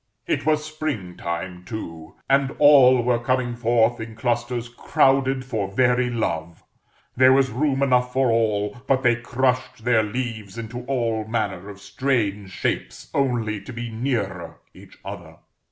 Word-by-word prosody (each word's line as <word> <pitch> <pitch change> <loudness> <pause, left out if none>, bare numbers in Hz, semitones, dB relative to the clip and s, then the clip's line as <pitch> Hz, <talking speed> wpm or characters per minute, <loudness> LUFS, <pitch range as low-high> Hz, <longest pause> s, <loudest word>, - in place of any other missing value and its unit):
It - - -1
was 155 -1 +2
Spring 155 - -4
time, 90 +1 -5
too; 85 -6 -8
and 135 0 +2
all 130 -4 +7
were 120 -1 +2
coming 120 0 -1
forth 120 0 +2
in 110 0 -7
clusters 120 +1 -1
crowded 135 +2 +1
for 110 -6 -2
very 125 +2 +2
love; 85 -8 -3 0.5
there 130 +1 +6
was 135 -2 +3
room 135 +2 0
enough 125 -2 +2
for 130 -1 +2
all, 110 +1 0
but 135 -1 +2
they 120 -2 +4
crushed 125 0 -1
their 120 -2 +4
leaves 110 -2 -4
into 115 +2 -6
all 115 -5 -1
manner 100 -4 -2
of 100 -1 -10
strange 105 -2 -1
shapes - - -4
only 115 -6 0
to 100 - -10
be 120 -1 -6
nearer 110 -6 -3 0.2
each - - -16
other. - - -8
120 Hz, 150 wpm, -23 LUFS, 110-130 Hz, 0.5 s, all